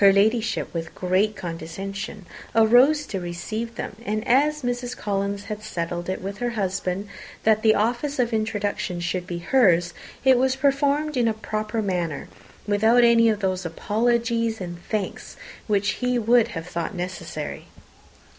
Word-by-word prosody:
Her 200 - +9
Ladyship, 220 +2 +1
with 165 -1 -5
great 190 +4 +1
condescension, 195 +4 -6 0.3
arose 250 +7 +5
to 195 - -4
receive 215 +7 -5
them; 205 - -6
and 215 0 -2
as 295 +4 +3
Mrs. 245 0 -2
Collins 200 0 -2
had 210 +1 -6
settled 175 -3 -4
it 185 - -3
with 195 +1 -5
her 245 - 0
husband 190 0 -2 0.4
that 220 0 +4
the 220 -1 +5
office 240 +7 0
of 240 -2 +1
introduction 205 -4 -1
should 175 +1 -2
be 175 - -4
hers, 175 -4 +3 0.3
it 260 -2 +6
was 260 0 +2
performed 285 +2 +1
in 240 -2 +3
a 220 - +1
proper 215 0 -3
manner, 175 -6 -2 0.4
without 220 +4 +4
any 230 -1 +6
of 215 -1 0
those 185 -1 0
apologies 230 +5 0
and 175 -2 -7
thanks 210 -3 -3 0.3
which 205 -1 +2
he 250 +5 0
would 235 0 +4
have 165 - -5
thought 175 +2 -4
necessary. 175 -4 -5
215 Hz, 155 wpm, -24 LUFS, 185-235 Hz, 0.4 s, Her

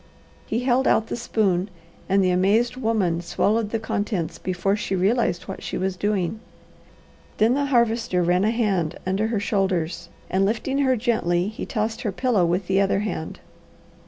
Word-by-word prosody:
He 230 +3 -1
held 255 +1 +2
out 220 - +3
the - - -2
spoon 205 -5 0 0.4
and 195 +1 +3
the 185 - +3
amazed 210 +7 +2
woman 215 -9 0
swallowed 210 +5 0
the 225 - -1
contents 205 -5 -3
before 185 +2 0
she 200 -2 -2
realized 195 -1 +1
what 190 - -7
she - - -4
was 190 0 -1
doing. 205 +1 -1 1.0
Then 220 +3 +4
the 285 +1 +1
Harvester 235 -7 +1
ran 180 +2 +2
a 215 - +3
hand 200 -9 0
under 195 +4 0
her 225 -2 -1
shoulders 185 -5 -1 0.2
and 190 +1 +1
lifting 235 +7 0
her 260 -2 +3
gently 205 -6 0
he 220 - -7
tossed 220 +1 -2
her 210 - -1
pillow 205 -4 +1
with 180 +3 0
the 190 +2 +2
other 195 0 +1
hand. 190 -6 -5
205 Hz, 170 wpm, -23 LUFS, 185-225 Hz, 1.0 s, Then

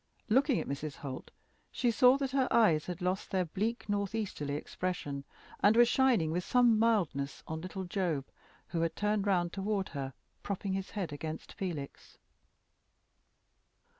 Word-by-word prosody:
Looking 265 +3 +4
at - - -4
Mrs. 140 +1 -4
Holt, 135 -3 -7 0.4
she 245 -2 +1
saw 250 +3 +6
that 275 -2 -2
her 265 -1 +2
eyes 170 -10 +4
had 180 0 -5
lost 185 +2 -1
their 185 -2 +1
bleak 215 +9 -2
north 205 0 -1
easterly 150 -10 -3
expression, 145 -4 -4 0.3
and 205 +2 +5
were 240 - +8
shining 240 -10 +3
with 175 +2 -1
some 240 -1 +4
mildness 175 -12 +1
on 160 0 -4
little 185 +2 -5
Job, 175 -7 -1 0.4
who 170 -2 -1
had 165 -1 0
turned 210 -1 0
round 175 -3 +2
toward 195 0 -1
her, 135 -3 -5 0.3
propping 200 -1 -3
his 195 0 -3
head 185 -8 -4
against 155 +2 -6
Felix. 160 -8 -6
190 Hz, 155 wpm, -32 LUFS, 160-220 Hz, 0.4 s, were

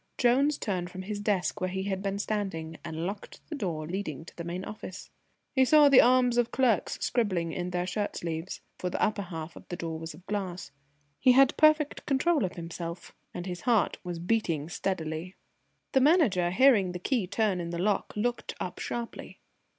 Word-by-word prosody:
Jones 275 +4 +3
turned 180 -4 -2
from 185 +1 -7
his 205 +1 -4
desk 205 -3 0
where 185 - 0
he 190 +1 -3
had 190 -1 -2
been 195 0 -2
standing, 195 -7 -3
and 160 +1 -4
locked 200 +2 -6
the 315 - -4
door 170 - -3
leading 170 -3 -3
into 160 - -13
the 170 - -6
main 175 +3 -4
office. 205 -3 -8 0.4
He 265 -1 +5
saw 295 +2 +7
the 275 - +8
army 250 -1 +4
of 240 -1 +2
clerks 240 -8 +2
scribbling 185 -9 0
in 180 0 -3
their 180 0 -1
shirt 205 +3 -2
sleeves, 165 +1 -4 0.2
for 180 - -2
the - - -3
upper 210 -1 +1
half 165 -3 -7
of - - -13
the 175 - -4
door 165 -2 -4
was 160 -1 -7
of 180 +3 -17
glass. 185 -6 -4 0.5
He 255 -1 +6
had 270 0 +5
perfect 310 -1 +3
control 290 +1 +2
of 180 - -5
himself, 170 0 -6 0.2
and 175 - -6
his 180 -2 -5
heart 235 -4 +2
was 175 -2 -4
beating 170 -5 0
steadily. 175 -1 -3 0.6
The 265 - +4
Manager, 255 - +4
hearing 200 -3 +4
the - - -3
key 205 +2 0
turn 200 -1 +1
in 170 - -4
the 170 - -4
lock, 200 +3 0
looked 240 +3 -2
up - - -5
sharply. 235 -1 -5
190 Hz, 195 wpm, -29 LUFS, 175-235 Hz, 0.6 s, the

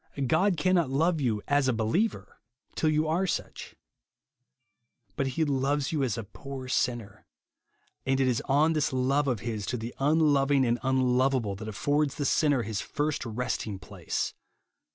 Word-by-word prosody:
God 175 +7 +2
cannot 175 -3 +2
love 160 +4 +1
you 110 -6 0
as 145 -2 +2
a 130 - +2
believer 110 - -1 0.3
till 155 - +1
you 155 +1 +1
are 175 +5 +1
such. - - -4 1.4
But 135 - 0
he 160 - +3
loves 140 0 0
you 155 -3 0
as 125 -6 0
a 115 - -3
poor 130 +5 -8
sinner. 120 -5 -2 0.8
And 135 0 +1
it 135 - +3
is 125 -2 +1
on 150 +4 +3
this 150 -2 0
love 135 +3 +1
of 120 -6 -1
his 110 -3 -3
to 125 - -1
the 115 +1 -6
unloving 145 -2 +3
and 120 0 +1
unloveable 130 -3 +1
that 110 +1 -7
affords 145 +7 0
the 145 - -2
sinner 145 -4 +2
his 105 0 -3
first 150 0 -2
resting 110 -3 -3
place. - - -4
135 Hz, 160 wpm, -28 LUFS, 120-150 Hz, 1.4 s, he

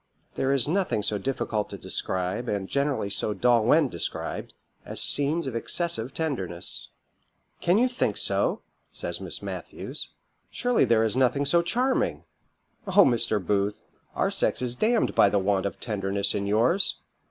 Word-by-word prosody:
"There 135 - 0
is 140 -2 +3
nothing 175 - 0
so 105 0 0
difficult 110 -2 -2
to - - -7
describe, 95 +6 -3
and 100 -2 -2
generally 140 -6 -1
so 105 +1 +4
dull 120 +2 +3
when 150 +5 +4
described, 85 -9 -4 0.3
as - - -5
scenes 145 +3 +3
of 130 -3 -4
excessive 125 -1 -2
tenderness." 120 - -3 0.7
"Can 175 +3 +2
you 250 +3 +4
think 245 0 -1
so?" - - 0 0.3
says - - -3
Miss - - -4
Matthews; - - -6 0.4
"surely 245 -1 +1
there 115 -1 +3
is 110 0 0
nothing 130 +2 +2
so 170 +5 +4
charming! 250 +9 0 0.6
Oh! 195 +1 +6
Mr. 115 -4 +1
Booth, 100 +2 -1 0.3
our - - +1
sex - - 0
is 125 -1 -2
d 215 - +1
ned - - 0
by 100 - +5
the 100 - +1
want 100 0 +1
of - - -8
tenderness 100 -3 -1
in 100 0 -2
yours. 120 - +2
120 Hz, 160 wpm, -26 LUFS, 100-155 Hz, 0.7 s, Oh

